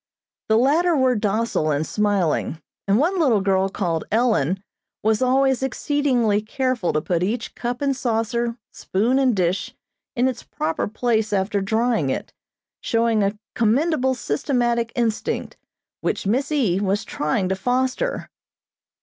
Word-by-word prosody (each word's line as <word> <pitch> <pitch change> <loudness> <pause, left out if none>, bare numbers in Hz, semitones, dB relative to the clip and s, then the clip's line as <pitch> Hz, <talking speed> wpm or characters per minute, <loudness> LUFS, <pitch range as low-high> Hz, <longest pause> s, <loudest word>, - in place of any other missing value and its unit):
The 220 - +5
latter 315 +7 +3
were 260 -1 +3
docile 210 -5 0
and 150 +1 0
smiling, 195 -6 0 0.3
and 200 +1 +4
one 350 +8 +1
little 255 -10 +3
girl 195 -1 +1
called 170 -5 -2
Ellen 210 - +1 0.4
was 220 +1 +2
always 265 0 +3
exceedingly 260 -5 +1
careful 250 -3 -1
to 150 - +1
put 170 +1 -1
each 220 +6 -2
cup 245 +3 -4
and 275 -1 +1
saucer, 235 -1 -1
spoon 235 +8 0
and 255 -4 +3
dish 185 0 -1 0.4
in 245 +2 +2
its 255 -2 -3
proper 160 +1 -2
place 220 0 0
after 200 0 0
drying 220 - +1
it, - - -4 0.5
showing 230 -1 +1
a 200 +1 0 0.2
commendable 260 +4 +2
systematic 235 - 0
instinct, 230 -3 -1 0.4
which - - -2
Miss 255 +9 0
E. 225 -12 +2
was 205 +2 0
trying 185 +4 -1
to 190 - +1
foster. 255 - -1
225 Hz, 140 wpm, -22 LUFS, 195-255 Hz, 0.5 s, The